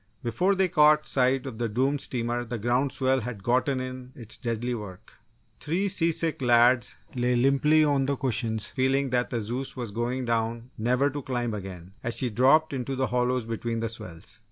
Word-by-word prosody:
Before 175 - +1
they 190 0 +2
caught 155 -3 +5
sight 130 +1 +1
of 120 -4 -7
the 120 -1 -1
doomed 135 +6 0
steamer 120 -1 -2
the 120 0 -5
ground 125 +5 0
swell 130 0 +1
had 115 -4 -6
gotten 130 +3 +1
in 130 0 -7
its 115 -6 -6
deadly 120 +1 -3
work. 100 -5 -8 0.5
Three 175 +7 -1
seasick 165 -4 +1
lads 120 0 +4 0.2
lay 125 0 +1
limply 140 +5 +4
on 140 -3 +2
the 140 - +1
cushions 115 -5 -1
feeling 135 +2 0
that 125 0 +1
the 120 - -2
Zeus 125 +6 -5
was 120 -4 -4
going 120 +4 -2
down 115 +1 -2
never 125 +5 +1
to 145 +1 -5
climb 120 -3 -2
again, 95 -3 -8
as 115 0 -3
she 125 -3 -1
dropped 135 +8 +4
into 135 0 -3
the 130 0 0
hollows 125 -1 +1
between 115 0 -3
the 115 0 -2
swells. 100 -1 -10
125 Hz, 185 wpm, -27 LUFS, 115-135 Hz, 0.5 s, caught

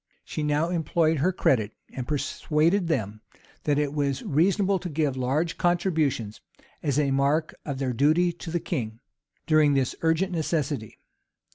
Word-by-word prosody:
She - - -4
now 150 +2 +1
employed 165 -2 +1
her 180 +7 +2
credit, 110 - +1 0.2
and 125 -2 -5
persuaded 155 +5 +1
them 110 -9 -2 0.4
that 145 -1 +2
it 145 -1 0
was 140 -2 -1
reasonable 190 +5 +2
to 180 - -5
give 150 -3 0
large 140 +6 -1
contributions, 160 - 0 0.4
as 140 -2 0
a 145 -2 +2
mark 140 +4 +1
of 140 -3 -3
their 130 -2 -1
duty 155 +8 +3
to 170 - -9
the 170 +1 0
king, 115 -10 -4 0.5
during 155 -3 +4
this 130 -2 +1
urgent 165 +4 +1
necessity. 150 - -2
150 Hz, 150 wpm, -26 LUFS, 135-165 Hz, 0.5 s, during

